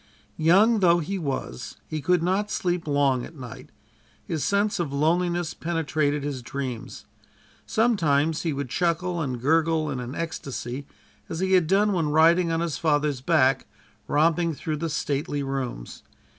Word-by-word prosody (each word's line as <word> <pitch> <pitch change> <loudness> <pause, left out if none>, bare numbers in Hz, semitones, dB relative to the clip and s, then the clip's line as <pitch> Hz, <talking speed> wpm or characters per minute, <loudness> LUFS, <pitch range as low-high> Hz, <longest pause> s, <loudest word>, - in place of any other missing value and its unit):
Young 200 +8 +5
though 175 -3 +5
he 185 +4 -3
was 135 - -4
he 155 -1 -4
could 180 +2 +2
not 195 +4 0
sleep 175 -4 -1
long 140 -3 +2
at 165 - -10
night. 125 -5 -10 0.6
His 160 -4 -2
sense 205 +1 +1
of 165 -5 -2
loneliness 170 +3 +1
penetrated 155 -3 -1
his 140 -3 -3
dreams. 125 -2 -6 0.6
Sometimes 165 -9 +2
he 165 - -1
would 140 -2 -4
chuckle 175 +3 0
and 130 -5 -3
gurgle 160 +3 +2
in 130 - -3
an 125 +3 -6
ecstacy, 140 -4 -5 0.4
as 165 - -4
he 190 0 0
had 180 -4 +4
done 200 +3 +3
when 165 -5 0
riding 165 +3 +4
on 165 0 0
his 170 -3 -2
father's 145 -4 +1
back, 135 -3 +2 0.4
romping 165 +2 +2
through 155 +1 -3
the 165 +2 -3
stately 145 -1 -2
rooms. 130 - -5
160 Hz, 155 wpm, -25 LUFS, 140-175 Hz, 0.6 s, Young